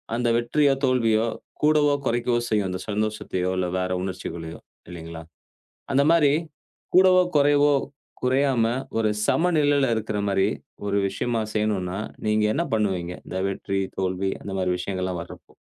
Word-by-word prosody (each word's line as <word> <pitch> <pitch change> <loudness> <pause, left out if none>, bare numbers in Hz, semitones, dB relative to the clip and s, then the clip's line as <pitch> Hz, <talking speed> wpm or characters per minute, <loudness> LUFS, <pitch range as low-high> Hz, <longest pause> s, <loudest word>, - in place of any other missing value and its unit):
அந்த 120 0 0
வெற்றியோ, 140 +4 +2
தோல்வியோ, 115 -3 +2 0.4
கூடவோ, 150 -1 +4
குறைக்கவோ 120 0 +1
செய்யும். 105 -3 +1
அந்த 90 0 -4
சந்தோஷத்தையோ, 105 -3 -1
இல்ல 90 -1 0
வேற 90 0 -2
உணர்ச்சிகளயோ, 85 -3 -6 0.3
இல்லைங்களா. 85 -1 -8 0.7
அந்த 140 +1 +4
மாரி 150 -4 +4 0.6
கூடவோ, 185 0 +7 0.2
குறைவோ 145 0 +4 0.5
குறையாம, 130 -2 +2 0.3
ஒரு 110 -1 +2 0.2
சமநிலைல 150 -5 +3
இருக்குற 110 -1 -2
மாரி 95 -1 +2 0.4
ஒரு 100 0 0
விஷயமா 115 +3 -2
செய்யணும்னா, 100 -4 -1 0.3
நீங்க 105 0 +2
என்ன 165 - +1
பண்ணுவீங்க? 95 -5 -1
இந்த 95 - -4
வெற்றி, 100 0 -2 0.2
தோல்வி 95 0 -1
அந்த 100 - -6
மாரி 90 -1 +1
விஷயங்கள்லாம் 90 -1 -3
வர்றப்போ? 85 - -13
110 Hz, 130 wpm, -24 LUFS, 95-135 Hz, 0.7 s, கூடவோ